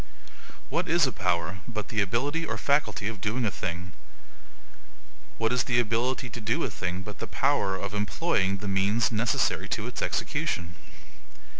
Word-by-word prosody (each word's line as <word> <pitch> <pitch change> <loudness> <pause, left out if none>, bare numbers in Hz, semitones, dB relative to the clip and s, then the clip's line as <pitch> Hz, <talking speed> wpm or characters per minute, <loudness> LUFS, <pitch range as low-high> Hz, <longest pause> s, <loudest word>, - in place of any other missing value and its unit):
What - - 0
is 170 -1 +5
a 130 - 0
power, 90 -3 0
but 110 -4 -4
the 110 -3 +2
ability 140 - 0
or 115 -8 -2
faculty 105 - +1
of 105 -3 -4
doing 115 +3 0
a 105 - +1
thing? 90 0 -4 1.5
What 115 +2 +1
is 125 -1 +2
the 120 -1 +3
ability 120 +3 +1
to 120 - -6
do 110 +2 +1
a - - -1
thing, 90 +1 -3
but 105 +1 -8
the 115 - -4
power 130 -7 +2
of 100 +1 -4
employing 105 - +1
the 100 - -6
MEANS 100 +4 +2
necessary 115 +2 +1
to - - -1
its - - -4
execution? 85 0 -1
110 Hz, 165 wpm, -28 LUFS, 95-120 Hz, 1.5 s, is